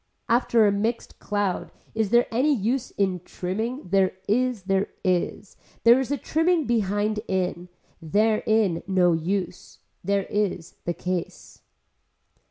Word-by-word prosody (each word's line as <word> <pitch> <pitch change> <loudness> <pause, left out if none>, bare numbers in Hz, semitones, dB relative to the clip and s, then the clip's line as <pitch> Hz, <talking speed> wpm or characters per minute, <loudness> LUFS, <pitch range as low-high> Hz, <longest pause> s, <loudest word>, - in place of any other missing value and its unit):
After 235 -1 +3
a 205 - +4
mixed 220 +4 -2
cloud 205 -3 -2 0.2
is 220 -2 0
there 240 +2 +4
any 265 +6 +3
use 245 +4 -1
in 190 -2 0
a - - -13
trimming, 220 - -4
there 190 0 +3
is, 245 -1 +1
there 195 +1 +1 0.2
is. 185 +1 -1 0.3
There 235 +2 +7
is 265 - -2
a 285 - 0
trimming 325 +3 +1
behind 210 -2 0
in. 180 -1 -2 0.3
There 215 +7 +2
in 215 -6 +2
no 180 -3 +3
use. 180 +2 -3 0.3
There 200 +1 +1
is 190 -4 -2
the 175 - -1
case. 180 0 -5
205 Hz, 140 wpm, -25 LUFS, 185-230 Hz, 0.3 s, There